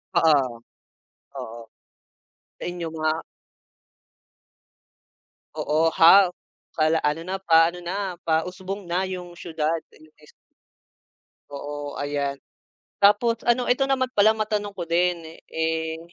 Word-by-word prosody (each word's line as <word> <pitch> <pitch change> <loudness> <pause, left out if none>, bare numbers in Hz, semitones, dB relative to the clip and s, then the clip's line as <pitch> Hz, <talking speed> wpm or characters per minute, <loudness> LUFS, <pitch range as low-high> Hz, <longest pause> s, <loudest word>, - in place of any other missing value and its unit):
Oo. 140 -8 +3 0.8
Oo. 115 +1 -7 1.0
Sa - - -9
inyo 175 -2 -5
nga 155 0 +1 2.4
Oo 155 +2 +1
half 180 +2 +7 0.4
pala, 160 0 +2
ano 150 +2 0
na, 190 +1 -3
pa-ano 165 0 +4
na 185 0 -4
pa-usbong 185 +5 -2
na 185 +2 0
yung 180 -2 -7
siyudad 160 -1 -2 0.2
imbes 155 -1 -20 1.2
Oo 145 0 -6
ayan. 145 -1 -2 0.6
Tapos 210 +3 +4
ano 245 +1 +2
ito 270 +2 +3
naman 260 -2 +1
pala 215 +2 +6
matanong 210 -2 -2
ko 180 - -4
din, 170 -1 0 0.2
eh 160 0 -1
170 Hz, 105 wpm, -24 LUFS, 155-195 Hz, 2.4 s, half